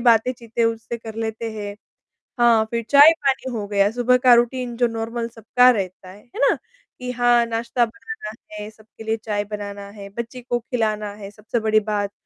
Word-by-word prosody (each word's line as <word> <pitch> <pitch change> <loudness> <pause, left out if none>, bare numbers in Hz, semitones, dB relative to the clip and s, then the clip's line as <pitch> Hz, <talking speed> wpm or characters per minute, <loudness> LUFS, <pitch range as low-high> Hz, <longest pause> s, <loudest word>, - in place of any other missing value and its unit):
बातें-चीतें 235 0 +2
उनसे 230 +1 -2
कर 220 -1 -9
लेते 225 0 -3
हैं। 205 -1 -6 0.7
हाँ, 230 -2 +5
फिर 230 0 -1
चाय-पानी 280 -3 +5
हो 210 -3 -3
गया, 200 0 +3
सुबह 245 +1 +3
का 250 -1 +6
रूटीन 240 0 +1
जो 240 -1 +3
नॉर्मल 230 +1 -3
सबका 245 +3 +4
रहता 185 -3 -4
है, 200 +3 -13
है - - -5
ना? - - +3 0.5
कि 250 - -3
हाँ, 240 -1 +3
नाश्ता 235 +1 0
बनाना 230 - -8 0.2
है, 210 0 -7
सबके 220 0 -15
लिए 220 0 -1
चाय 205 -2 -1
बनाना 200 -1 -6
है, 200 -1 -10
बच्ची 235 +2 -5
को 240 0 -1
खिलाना 215 -3 -2
है, 200 -1 -9
सबसे 215 +3 -3
बड़ी 215 0 +3
बात, 205 -1 -2
225 Hz, 180 wpm, -22 LUFS, 210-240 Hz, 0.7 s, का